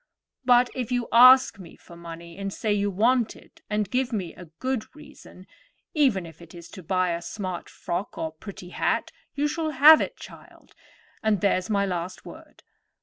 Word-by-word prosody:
But 245 0 +4
if 250 -2 -4
you 245 -1 -1
ask 250 -1 +7
me 175 -3 -12
for 170 - -16
money, 170 0 -10
and 195 0 -5
say 215 +1 -1
you 205 0 0
want 230 +4 +1
it, - - -19
and 210 -1 -1
give 255 +4 -1
me 190 -7 -4
a 180 - -12
good 240 - -5
reason—even 275 - -4
if 165 0 -14
it 170 0 -14
is 170 -1 -11
to 185 - -11
buy 185 +1 0
a 170 0 -3
smart 185 -1 -6
frock 190 +6 -5
or 160 - -3
pretty 180 +2 -11
hat—you 285 +9 -2
shall 315 +1 -2
have 305 +2 +7
it, - - -4
child; - - -15 0.5
and 215 -2 +1
there's 185 -1 +1
my 200 -2 +1
last 180 -1 -5
word. - - -14
200 Hz, 175 wpm, -25 LUFS, 180-250 Hz, 0.5 s, ask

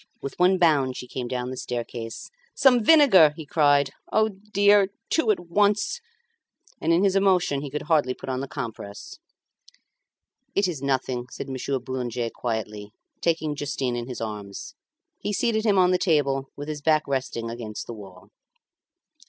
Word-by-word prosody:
With 140 - -7
one 185 +1 +4
bound 145 -7 +2
she - - -6
came 125 0 -5
down 125 0 -3
the - - -5
staircase. 120 - -6 0.2
"Some 255 -4 +4
vinegar," 215 - +7
he 160 - -7
cried. 145 -1 +3 0.2
"O 220 0 +3
dear! 205 0 +3 0.2
two 295 -9 +2
at 215 - +3
once!" 205 - +1 0.8
And 165 - +1
in 170 +3 +3
his 195 -1 +2
emotion 185 -7 +2
he 145 - -5
could 150 +2 -4
hardly 150 -5 +1
put - - -11
on 130 -1 -2
the 135 - -4
compress. 110 - -7 1.4
"It 200 -1 +3
is 160 -7 -4
nothing," 130 -2 -1
said 135 - -7
Monsieur 135 +1 -2
Boulanger 125 -2 -4
quietly, 105 -3 -4 0.3
taking 160 -3 0
Justin 135 -3 -2
in 120 0 -4
his 125 -3 -6
arms. 105 -3 -6 0.5
He 210 - -3
seated 220 +1 0
him 200 -2 +3
on 180 -1 +5
the 180 - +2
table 140 -5 +1
with 145 +1 -7
his 150 -1 -5
back 155 0 +3
resting 130 -4 -3
against 115 -2 -6
the 120 - -7
wall. 95 -4 -13
145 Hz, 165 wpm, -25 LUFS, 125-185 Hz, 1.4 s, vinegar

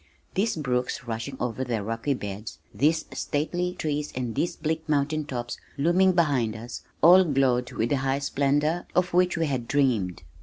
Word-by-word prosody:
These 210 +4 +1
brooks 125 -6 -1
rushing 115 +3 -4
over 125 +1 -2
their 115 -5 -2
rocky 115 +6 -1
beds, 100 -5 -6 0.2
these 155 +9 +2
stately 175 +4 -2
trees 150 -2 -2
and 125 -3 -2
these 170 - -1
bleak 160 0 -3
mountain 150 +1 +1
tops 120 -4 -5 0.2
looming 175 +6 +4
behind 140 -10 +2
us, 115 +2 -7 0.2
all 180 +3 +9
glowed 135 -6 +1
with 115 - 0
the 140 - +2
high 135 0 0
splendor, 145 +4 0
of 180 0 +2
which 180 0 +3
we 165 - +1
had 130 -5 -2
dreamed. 120 - +1
140 Hz, 165 wpm, -26 LUFS, 120-160 Hz, 0.2 s, all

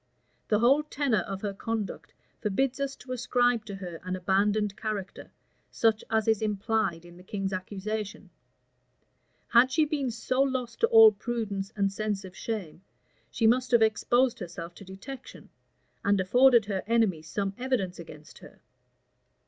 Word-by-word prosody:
The 210 - +3
whole 255 +7 +4
tenor 280 -7 0
of 195 +2 -5
her 205 -1 -2
conduct 220 +1 -4 0.3
forbids 255 +6 0
us 275 0 -2
to 255 - -12
ascribe 245 -2 +1
to 200 - -6
her 180 -4 -7
an 185 +1 -4
abandoned 200 +2 +1
character, 215 -4 -5 0.4
such 220 -1 +1
as 220 -1 +1
is 220 -1 +2
implied 210 -4 -1
in 175 0 -14
the 180 - -14
king's 195 0 -3
accusation: 205 +3 -5 1.2
had 245 +2 +5
she 310 +3 +3
been 290 -3 -1
so 255 +3 -1
lost 255 -4 -1
to 460 - +4
all 450 -2 +8
prudence 210 - -4
and 200 -1 0
sense 205 -1 -3
of 185 0 -11
shame, 195 -8 -5 0.5
she 225 - -1
must 250 +2 +3
have 235 -2 +5
exposed 240 +3 +2
herself 175 -2 -7
to 200 - -12
detection, 200 +8 -10 0.5
and 200 0 +2
afforded 240 +4 +5
her 195 -2 -2
enemies 210 -9 +1
some 195 +4 -2
evidence 240 -9 -1
against 155 -2 -12
her. - - -15
215 Hz, 155 wpm, -28 LUFS, 195-245 Hz, 1.2 s, all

